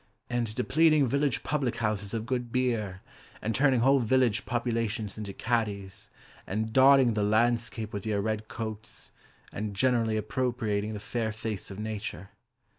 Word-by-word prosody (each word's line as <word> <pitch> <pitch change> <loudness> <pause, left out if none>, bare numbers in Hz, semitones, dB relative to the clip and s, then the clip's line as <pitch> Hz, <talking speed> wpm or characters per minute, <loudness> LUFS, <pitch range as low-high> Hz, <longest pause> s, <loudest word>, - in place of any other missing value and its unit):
And 120 -3 -1
depleting 150 +4 +4
village 140 +2 0
public 140 -5 0
houses 105 -1 -1
of 110 0 -3
good 125 -2 -2
beer, 115 -7 -1 0.4
And 110 - -2
turning 130 -1 +3
whole 135 +3 +5
village 120 -2 +2
populations 115 -3 -1
into 105 -2 -5
caddies, 100 -3 -2 0.4
And 110 +3 -2
dotting 135 -2 +6
the 105 - 0
landscape 110 +1 +1
with 100 +1 -4
your 105 -2 +1
red 110 +1 -2
coats, 110 -2 -6 0.4
And 105 0 -4
generally 115 0 +2
appropriating 110 -3 -1
the - - -5
fair 110 +1 -2
face 110 -2 -5
of 95 - -8
Nature. 105 -3 -5
110 Hz, 145 wpm, -29 LUFS, 105-125 Hz, 0.4 s, dotting